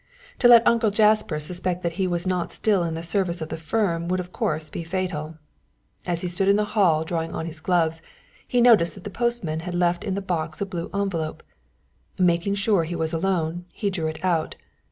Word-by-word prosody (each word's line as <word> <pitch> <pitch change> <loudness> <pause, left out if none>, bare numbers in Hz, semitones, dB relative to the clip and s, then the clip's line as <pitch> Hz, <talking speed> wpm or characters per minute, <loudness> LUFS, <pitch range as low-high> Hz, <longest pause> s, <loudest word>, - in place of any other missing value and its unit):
To 245 - +6
let 235 -1 +8
Uncle 230 -2 +4
Jasper 210 -5 +3
suspect 180 +3 -3
that 170 - 0
he 185 - +2
was 175 0 -1
not 180 -2 -1
still 205 -4 +2
in 165 -1 -2
the 165 - -5
service 175 0 0
of 160 - -5
the - - -3
firm 170 0 -1
would 185 +1 0
of 180 0 -6
course 155 -2 -2
be 170 - -5
fatal. 165 -3 -3 0.7
As 170 -1 0
he 180 - -2
stood 175 +2 -1
in 200 - +5
the 210 0 +1
hall 170 -7 +3
drawing 165 0 -3
on 160 - -3
his 165 -1 -7
gloves 165 -1 +1 0.5
he 245 - +2
noticed 220 -9 +5
that 195 - -12
the 205 - -6
postman 235 -9 -1
had 175 +1 -5
left 175 0 +1
in 195 -3 -2
the - - -1
box 160 -4 -3
a 200 - -1
blue 175 -3 -5
envelope. 180 -6 -2 0.7
Making 180 +2 +2
sure 200 -3 +2
he 170 +2 -4
was 160 -1 -2
alone, 175 -1 -1
he 205 -3 -2
drew 165 -4 -2
it 155 +3 -5
out. 170 -4 0
175 Hz, 215 wpm, -24 LUFS, 165-195 Hz, 0.7 s, let